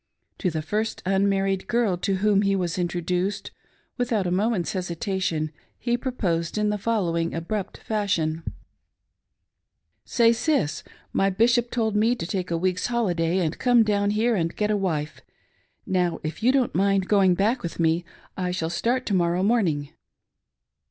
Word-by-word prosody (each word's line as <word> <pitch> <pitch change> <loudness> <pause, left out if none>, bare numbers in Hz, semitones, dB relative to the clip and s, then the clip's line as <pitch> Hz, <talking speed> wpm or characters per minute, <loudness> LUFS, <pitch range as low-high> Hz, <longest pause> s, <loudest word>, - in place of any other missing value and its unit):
To 185 - +1
the 155 -2 -3
first 215 +7 -2
unmarried 195 0 +1
girl 235 -6 +1
to 195 +2 -1
whom 200 +1 +3
he 195 -1 +2
was 180 -1 -1
introduced, 180 +3 -2 0.5
without 230 -6 0
a 175 - -1
moment's 195 -1 0
hesitation 175 -3 -2 0.3
he 240 -1 0
proposed 200 -10 -2
in 210 0 +1
|he 210 - -1
following 170 -7 0
abrupt 185 +4 -3
fashion: 185 -7 -1 0.8
" - - -54
Say, 235 -2 +3
sis! 230 - 0 0.3
My 195 - +2
bishop 235 +4 +2
told 220 -3 -1
me 225 +4 +3
to 170 - -5
take 185 +1 -3
a 170 - 0
week's 185 +1 0
holiday, 180 -7 +1
and 155 - -2
Gome 245 -2 +5
down 205 -1 +1
here 220 +3 +2
and 165 -3 -1
get 210 0 0
a - - +2
wife. 155 -7 -2 0.6
Now, 180 -3 0
if 155 +6 -5
you 245 +3 +4
don't 260 -3 +1
mind 195 +1 +2
going 195 -3 +4
back 220 +7 +1
with 170 - -6
me, 165 +1 +2 0.3
I 180 -1 -2
shall 170 -2 -2
start 240 +9 0
to 205 - -1
morrow 175 0 +2
morning." 180 -10 +1
195 Hz, 160 wpm, -25 LUFS, 170-215 Hz, 0.8 s, Gome